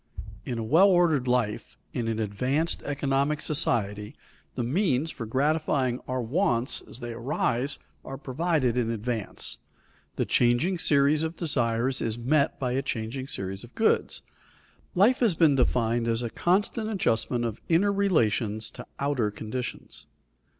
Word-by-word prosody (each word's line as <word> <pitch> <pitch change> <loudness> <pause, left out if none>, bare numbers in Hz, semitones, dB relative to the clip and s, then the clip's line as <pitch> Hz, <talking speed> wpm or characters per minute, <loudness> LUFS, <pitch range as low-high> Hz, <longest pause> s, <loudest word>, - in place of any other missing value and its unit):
In 120 - -3
a 115 - -2
well 160 - +5
ordered 170 -8 +3
life, 125 -4 -1 0.2
in 120 -2 -2
an 115 -1 -1
advanced 125 +10 -1
economic 140 +1 0
society, 105 -9 0 0.4
the 125 - -1
means 155 - +1
for 115 - -6
gratifying 135 -1 +1
our 130 -1 -2
wants 130 - +1
as 125 - -10
they 120 -1 -5
arise 125 +1 -1 0.3
are 135 - -7
provided 140 -2 0
in 120 -2 +1
advance. 115 -1 -3 0.6
The - - 0
changing 125 +10 +2
series 145 +1 +3
of 160 +1 -2
desires 125 -5 0
is 110 0 -2
met 140 +5 +1
by 125 -2 -1
a 130 +2 0
changing 130 +1 -4
series 95 -6 -5
of 120 - -14
goods. 220 - +1 0.7
Life 210 +8 +4
has 225 -8 +3
been 160 -3 +5
defined 120 -2 +1
as 115 +1 0
a 115 - -3
constant 205 +5 0
adjustment 120 - 0
of 115 -1 -4
inner 185 +5 +4
relations 115 - +1
to - - -10
outer 140 -6 0
conditions. 110 +4 -6
130 Hz, 145 wpm, -27 LUFS, 115-155 Hz, 0.7 s, well